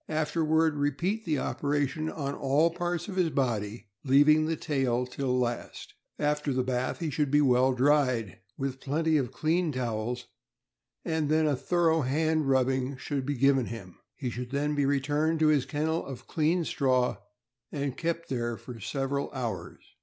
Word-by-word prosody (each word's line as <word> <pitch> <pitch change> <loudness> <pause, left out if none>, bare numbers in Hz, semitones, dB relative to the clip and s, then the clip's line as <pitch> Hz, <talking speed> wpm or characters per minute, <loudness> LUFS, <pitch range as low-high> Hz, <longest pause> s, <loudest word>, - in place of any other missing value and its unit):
Afterward, 155 0 +1
repeat 170 +10 -1
the 155 -4 0
operation 145 +3 -1
on 140 -3 -3
all 145 +5 +2
parts 175 0 -3
of 190 -2 -6
his 180 -3 +3
body, 115 -6 -1 0.2
leaving 150 +3 +5
the 165 - 0
tail 130 -6 0
till 135 +2 -4
the 125 0 +2
last. 120 -1 -4 0.2
After 150 0 0
the 130 -1 +1
bath, 125 0 -1
he 165 -3 -3
should 145 +1 0
be 145 +2 +4
well 130 -2 +4
dried 130 -5 +2 0.2
with 135 -1 -3
plenty 155 +3 +1
of 130 -4 -1
clean 160 +4 0
towels, 120 -1 -3 0.8
and 160 -3 0
then 155 +1 +3
a 150 -2 +2
thorough 165 +2 +2
hand 155 +2 +1
rubbing 130 0 +1
should 135 -1 -3
be 145 - 0
given 135 -1 +3
him. 95 -6 -9 0.2
He 130 -4 -4
should 125 +1 -5
then 145 +2 0
be 145 -2 +1
returned 145 +3 +1
to 155 - +5
his 145 -4 +2
kennel 160 +2 -1
of 135 -3 -8
clean 165 +2 +1
straw 130 -7 +1 0.5
and 140 -3 -2
kept 170 0 -2
there 120 -3 -2
for 120 -3 -10
several 135 +5 -2
hours. 125 -4 -5
140 Hz, 170 wpm, -28 LUFS, 130-155 Hz, 0.8 s, leaving